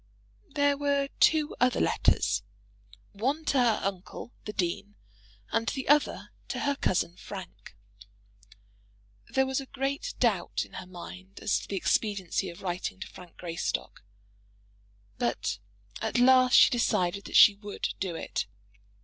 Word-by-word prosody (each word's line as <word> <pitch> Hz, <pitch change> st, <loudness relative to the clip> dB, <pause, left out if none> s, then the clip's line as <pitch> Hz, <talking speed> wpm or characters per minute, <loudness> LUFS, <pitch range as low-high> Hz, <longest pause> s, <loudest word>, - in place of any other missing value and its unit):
There 285 Hz, -1 st, +3 dB
were 280 Hz, -1 st, +1 dB
two 310 Hz, -1 st, +4 dB
other 250 Hz, 0 st, +3 dB
letters, -, -, +2 dB, 0.7 s
one 270 Hz, +10 st, -1 dB
to 275 Hz, -, +2 dB
her 235 Hz, -4 st, +3 dB
uncle, 195 Hz, +4 st, -5 dB
the 210 Hz, -, -4 dB
dean, 200 Hz, +1 st, -2 dB, 0.6 s
and 230 Hz, -, 0 dB
the 265 Hz, -2 st, -4 dB
other 295 Hz, +1 st, +2 dB, 0.2 s
to -, -, -3 dB
her 285 Hz, -1 st, +1 dB
cousin 180 Hz, -7 st, 0 dB
Frank. 185 Hz, -, -9 dB, 1.5 s
There 265 Hz, -, +2 dB
was 265 Hz, +1 st, -1 dB
great 280 Hz, -, -2 dB
doubt -, -, +1 dB
in -, -, -20 dB
her 185 Hz, -, -12 dB
mind 185 Hz, +1 st, -10 dB
as 205 Hz, -, +1 dB
to -, -, -10 dB
the 200 Hz, -, -3 dB
expediency 195 Hz, -1 st, 0 dB
of 170 Hz, +3 st, -11 dB
writing 175 Hz, -, -3 dB
to -, -, -5 dB
Frank 180 Hz, -2 st, -14 dB
Greystock; 165 Hz, -, -4 dB, 1.2 s
but 120 Hz, -3 st, -1 dB, 0.4 s
at -, -, -1 dB
last 255 Hz, 0 st, +6 dB
she -, -, +8 dB
decided 200 Hz, -5 st, +1 dB
that -, -, -6 dB
she 210 Hz, -, +9 dB
would 205 Hz, 0 st, -5 dB
do 185 Hz, -3 st, -2 dB
it. 100 Hz, -, -3 dB
210 Hz, 140 wpm, -29 LUFS, 180-270 Hz, 1.5 s, she